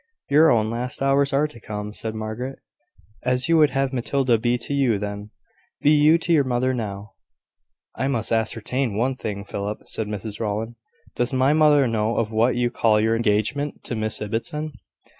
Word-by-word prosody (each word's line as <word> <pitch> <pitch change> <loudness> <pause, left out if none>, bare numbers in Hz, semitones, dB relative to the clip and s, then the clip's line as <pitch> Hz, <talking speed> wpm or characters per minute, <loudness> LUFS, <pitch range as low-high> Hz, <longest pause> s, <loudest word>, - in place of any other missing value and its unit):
"Your 155 +3 +6
own 110 -3 +2
last 125 +2 -3
hours 140 0 +3
are 140 +2 +2
to 150 -6 -14
come," 105 -1 -6
said 110 0 -5
Margaret. 110 +5 -5 0.6
"As 125 +2 +1
you 165 0 +4
would 150 -2 +5
have 135 -1 -1
Matilda 125 -1 +1
be 120 +2 +1
to 120 +4 -4
you 130 -6 +2
then, 105 +1 -5 0.5
be 145 - +3
you 155 +2 +5
to 170 0 0
your 150 -3 +4
mother 130 0 0
now." 105 -4 -5 0.8
"I 135 - -1
must 120 -6 0
ascertain 115 +1 -1
one 130 +4 0
thing, 100 -5 -5
Philip," 100 +1 -4
said 110 - -4
Mrs 105 0 -5
Rowland. 110 +1 -2 0.4
"Does 120 +2 -1
my 130 +2 +3
mother 150 -3 +5
know 110 0 0
of 115 -1 0
what 115 +3 +2
you 120 0 0
call 110 -3 +3
your 110 +1 +2
engagement 115 +6 -1
to 120 - -3
Miss 110 -1 -2
Ibbotson?" 150 +9 -3
120 Hz, 180 wpm, -23 LUFS, 110-135 Hz, 0.8 s, Your